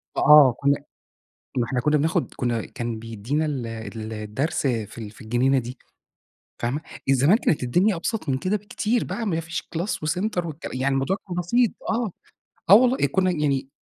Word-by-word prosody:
فآه. 150 -5 +7
كُنّا 140 0 +1 0.7
ما 125 - +2
إحنا 125 +1 -1
كُنّا 150 +4 +2
بناخُد 160 +4 0
كُنّا 120 -3 -1
كان 120 -2 -5
بيدّينا 115 +7 -2
ال 135 -6 -3
ال 110 -1 -6
الدرس 110 +9 -2
في 115 -4 -2
ال 110 -3 -6
في 110 - -18
الجنينة 125 +4 +2
دي 125 +1 -6 0.8
فاهمة؟ 125 +6 -2 0.3
آآ - - +6
زمان 140 - +4
كانت 170 - 0
الدنيا 180 - +2
أبسط 170 0 -3
من 130 - +1
كده 185 +9 -1
بكتير 215 +3 -1
بقى 235 - -4
ما 170 -6 0
فيش 165 0 -4
class 175 +4 -4 0.2
وcenter 180 +2 -1
والكل 160 -1 -6
يعني 130 +2 0
الموضوع 135 +8 +1
كان 180 - -5
بسيط 210 +7 +2 0.2
آه. 225 -2 0 0.6
آه - - +11
والله، 250 - +5
كُنّا 185 +6 +1
يعني 145 -5 0
140 Hz, 180 wpm, -24 LUFS, 120-180 Hz, 0.8 s, آه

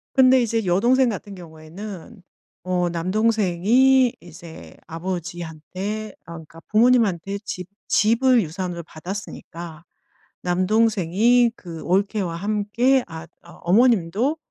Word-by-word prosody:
근데 260 -1 +6
이제 225 -2 -1
여동생 240 +8 +3
같은 205 -1 -6
경우에는 180 +5 -10 0.4
어 180 -1 0
"남동생이 215 +7 +2
이제 170 -1 -13
아버지한테 175 +4 -5
아 170 - -12
그러니까 165 0 -11
부모님한테 215 -5 +2
집 180 -2 -6 0.2
집을 235 +3 +3
유산으로 175 0 -5
받았으니까 170 -1 -8 0.6
남동생이 215 +4 +2
그 165 -3 -9
올케와 190 -1 0
함께 215 +6 +1
앗 160 0 -9
어 170 - -15
어머님도 225 - +2
195 Hz, 260 characters per minute, -22 LUFS, 170-230 Hz, 0.6 s, 근데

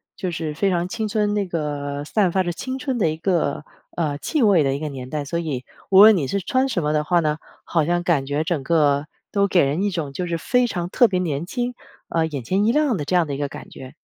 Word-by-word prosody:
就 185 -4 -3
是 160 -2 -3
非 195 +6 +1
常 175 -1 0
青 215 +3 -3
春 210 -1 0
那 205 -2 0
个 145 -3 -3
散 190 +1 +1
发 190 0 +1
着 175 - -2
青 260 +9 -5
春 265 -3 -2
的 165 - +3
一 155 - -3
个， 165 -4 0 0.3
呃， 150 -4 -1
气 300 - 0
味 195 -7 +5
的 135 -1 0
一 140 - -4
个 155 - -3
年 130 -2 -7
代。 150 0 -3
所 170 +4 -2
以 145 -7 -4 0.2
无 195 0 +7
论 215 +1 +9
你 150 -7 -1
是 200 - -1
穿 260 +8 0
什 185 -10 -1
么 150 +1 0
的 150 - +1
话 175 +3 +2
呢， 155 -1 0 0.2
好 165 -2 +1
像 175 +3 0
感 155 -6 +1
觉 145 +2 0
整 160 -4 -1
个 145 -2 +2 0.2
都 200 -1 +2
给 180 -6 +3
人 145 +7 -1
一 205 - +1
种 160 -7 -4
就 180 +5 -3
是 170 -1 -1
非 250 +7 +1
常 175 -5 -3
特 240 +6 +4
别 185 -4 -1
年 165 -2 -2
轻， 245 +3 -2 0.4
呃， 165 -1 +1
眼 140 -6 -5
前 190 - +1
一 220 - +3
亮 295 -2 +2
的 150 -6 -3
这 180 - 0
样 175 -2 +4
的 145 - -4
一 140 - -3
个 145 - -1
感 - - -10
觉。 130 -1 -11
170 Hz, 290 characters per minute, -22 LUFS, 150-200 Hz, 0.4 s, 论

